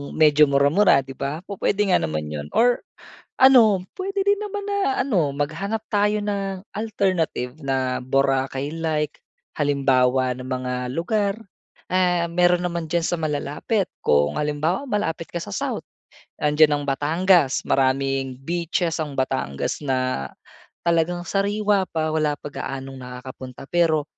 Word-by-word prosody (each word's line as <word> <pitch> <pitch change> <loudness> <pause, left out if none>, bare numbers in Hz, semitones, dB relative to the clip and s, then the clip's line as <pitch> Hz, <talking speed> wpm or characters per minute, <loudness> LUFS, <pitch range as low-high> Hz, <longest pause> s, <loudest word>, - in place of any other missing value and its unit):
medyo 150 -1 +5
mura-mura 140 +2 +4
'di 135 - -10
ba? 140 +5 -4
Pu-puwede 200 +1 -1
nga - - +5
naman 75 -1 -3
'yon 75 -1 -5
or 245 +1 +4 0.6
ano, 225 -8 +6
puwede 390 +1 -2
din 405 0 +2
naman 410 -1 -4
na 400 0 0
ano, 180 - +1
maghanap 165 +10 -3
tayo 205 +1 +3
ng 200 -2 -3
alternative 185 - -1
na 130 -2 -1
Boracay-like. 140 +4 -1 0.3
Halimbawa 130 -3 +2
ng 125 +1 -8
mga 130 -1 -2 0.2
lugar, 200 - 0 0.6
ah, 180 -2 +2
meron 175 +1 +2
naman 170 -2 -3
diyan 170 0 0
sa - - -1
malalapit. 155 +7 -1 0.2
Kung 75 - +2
halimbawa 155 - -1
malapit 170 -7 -2
ka - - -4
sa 170 - -6
South, - - -3 0.6
nandiyan 150 +1 +4
ang - - -5
Batangas. 155 +1 +3
Maraming 135 -1 +1
beaches 170 +2 -1
ang 155 -3 -3
Batangas 130 - -2
na 130 - -1 0.6
talagang 170 +1 +1
sariwa 200 +1 +1
pa, 155 -1 -2
wala 155 -2 +1
pa 145 - -9
gaanong 135 -1 -6
nakakapunta 125 0 -9
pero 165 -3 +3
155 Hz, 130 wpm, -23 LUFS, 135-195 Hz, 0.6 s, ano